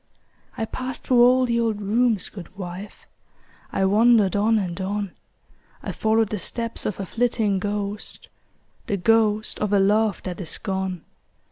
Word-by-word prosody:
I 225 - -1
passed 255 +3 -5
through 245 -2 +4
all 255 +1 +6
the 235 -1 +1
old 225 -3 0
rooms, 220 +1 +1
good 190 -1 -11
wife; 185 +2 -8 0.7
I 190 - +1
wandered 210 -1 +4
on 220 +2 +3
and 185 -2 -3
on; 200 0 -2 0.7
I - - -3
followed 220 -1 +1
the 210 - -3
steps 230 +4 -2
of 205 - -4
a 195 - -3
flitting 220 -1 0
ghost, 205 +1 -4 0.6
The 200 - 0
ghost 215 +2 +2
of 210 -1 -1
a 205 - +4
love 210 +2 +2
that 185 +1 -5
is 165 - -5
gone. 190 -4 -3
210 Hz, 155 wpm, -23 LUFS, 195-225 Hz, 0.7 s, all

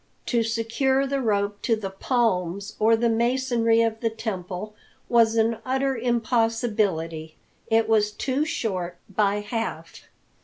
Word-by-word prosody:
To 235 -2 +1
secure 230 +4 +1
the 275 0 -1
rope 205 -3 0
to 230 - +2
the 200 -3 -5
palms 200 -3 -1
or 225 +1 +5
the 235 +1 +1
masonry 235 -1 +2
of 225 -1 -1
the 230 - 0
temple 210 -2 -5 0.4
was 230 -1 +4
an 225 0 +2
utter 265 +1 0
impossibility. 225 -9 0 0.3
It 225 0 +3
was 215 -2 +3
too 265 +6 -1
short 185 - -3
by 205 +1 +1
half. 205 -7 -5
225 Hz, 130 wpm, -25 LUFS, 205-235 Hz, 0.4 s, or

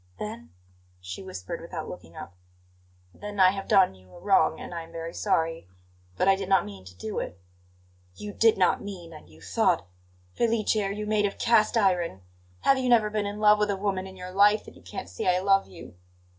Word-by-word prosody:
"Then?" 225 +3 -7 0.5
she 90 +1 -7
whispered, 95 -1 -7
without - - -6
looking - - -10
up. 85 - -9 0.8
"Then 205 -1 -8
I 185 -1 +7
have 195 0 -6
done 195 - +5
you 95 -1 -20
a - - -12
wrong, 180 -5 +3
and - - -8
I 170 - -4
am 165 0 -12
very 165 0 -6
sorry. 165 - -1 0.5
But - - +1
I 195 - +6
did 195 -1 -5
not 195 - +4
mean 100 -2 -10
to 90 -1 -13
do 110 +4 -4
it." 90 - -6 0.8
"You 210 -1 -7
'did 225 +1 +4
not 185 -2 +3
mean' 180 -5 -8
and 150 - -13
you 80 0 -18
'thought' - - +1 0.5
Felice, 230 -2 +1
are 200 -2 0
you 210 +1 -4
made 210 -1 +2
of 200 - -7
cast 230 0 +3
iron? 175 - +1 0.4
Have 270 - +4
you 255 -1 0
never 220 -3 +4
been 210 -1 -1
in 205 +1 -5
love 210 0 +5
with 210 0 +1
a 200 - 0
woman 190 -1 -2
in 190 0 -12
your 180 0 -8
life 205 +3 +4
that - - -13
you - - -16
can't - - -7
see 90 - -5
I 180 0 +4
love 195 +1 +3
you?" 95 - -12
195 Hz, 215 wpm, -27 LUFS, 165-210 Hz, 0.8 s, I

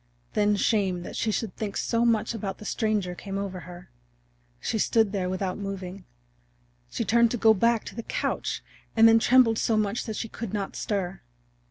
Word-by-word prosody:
Then 210 0 +3
shame 195 -4 +1
that - - -8
she 225 - 0
should 215 -2 -3
think 210 -2 -4
so 230 0 +1
much 225 -1 +2
about 200 -3 -4
the 210 - -11
stranger 210 -5 0
came 195 +2 -6
over 195 -2 -4
her. 175 0 -12 0.7
She 220 - -2
stood 220 -1 +3
there 190 -3 -1
without 185 +1 -2
moving; 195 -1 -6 0.8
she - - -3
turned 235 0 +4
to 245 - -2
go 220 0 +6
back 230 +2 +2
to - - -7
the 230 - -4
couch, - - -2 0.3
and 225 0 +8
then 225 0 +6
trembled 235 -2 +5
so 225 - +2
much 215 +1 0
that 220 - -4
she 225 - -3
could 220 -2 -5
not 200 -2 -3
stir. 195 -4 -3
210 Hz, 190 wpm, -26 LUFS, 195-225 Hz, 0.8 s, and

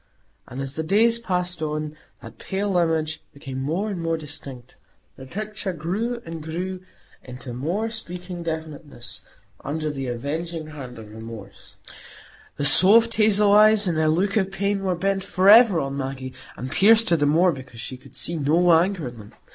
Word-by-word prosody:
And 130 +1 -6
as 135 0 -4
the 160 - -3
days 225 +8 +3
passed 180 -5 -2
on, 155 0 -3 0.3
that 115 -1 -12
pale 195 0 -2
image 160 -2 0
became 135 -2 -6
more 165 +10 -1
and 180 -4 -4
more 165 0 -1
distinct; 140 -5 -9 0.4
the 130 - -11
picture 210 +2 -5
grew 215 +9 -3
and 165 -1 -7
grew 180 +4 -5 0.4
into 125 0 -9
more 175 - -2
speaking 180 -4 -7
definiteness 160 -5 -6 0.4
under 155 +2 -3
the 135 -2 -5
avenging 155 +7 -4
hand 130 -5 -9
of 110 -1 -11
remorse; 110 -3 -11 0.8
the 145 - -1
soft 220 +10 +7
hazel 210 -2 +4
eyes, 215 0 +6
in 175 - +1
their 160 0 +1
look 195 +6 +1
of 195 -2 0
pain, 200 0 -1
were 185 -2 0
bent 195 +2 -1
forever 200 +1 +6
on 135 -1 -3
Maggie, 130 -1 -5 0.2
and 130 +1 -6
pierced 225 +1 +5
her - - +6
the 145 -2 +1
more 170 +5 +4
because 130 -5 -10
she 120 +3 -6
could 125 - -17
see 170 - -4
no 165 +4 +3
anger 170 -2 +2
in 120 -1 -9
them. 105 -1 -13
165 Hz, 170 wpm, -23 LUFS, 140-195 Hz, 0.8 s, soft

